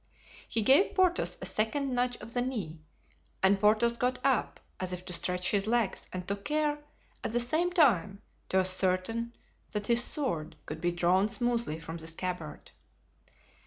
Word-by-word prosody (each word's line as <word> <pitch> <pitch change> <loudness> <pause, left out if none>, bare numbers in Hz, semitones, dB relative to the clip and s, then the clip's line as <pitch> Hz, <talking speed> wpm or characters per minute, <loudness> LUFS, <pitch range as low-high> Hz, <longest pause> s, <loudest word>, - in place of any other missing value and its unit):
He 225 - 0
gave 275 - +4
Porthos 365 -2 +3
a - - -3
second 260 +5 0
nudge 245 0 0
of 220 +2 -8
the 245 - 0
knee 210 -11 -4 0.6
and 195 +1 +4
Porthos 220 +3 +3
got 250 +1 0
up 265 -4 0 0.2
as 185 -1 -3
if 180 0 -7
to 180 - -5
stretch 180 +1 0
his 200 0 +1
legs 230 -3 0
and 180 -1 -6
took 200 0 -3
care 300 0 0 0.4
at - - -3
the 240 - +2
same 315 +9 +1
time 205 - +3 0.3
to 190 - +1
ascertain 185 +5 +2 0.4
that 210 -1 -3
his 235 +1 +4
sword 170 - 0
could 155 +1 -7
be 175 0 +1
drawn 180 +4 +2
smoothly 235 -8 -1
from 165 0 -7
the 160 -1 -6
scabbard. 165 -2 -5
210 Hz, 165 wpm, -29 LUFS, 180-245 Hz, 0.6 s, gave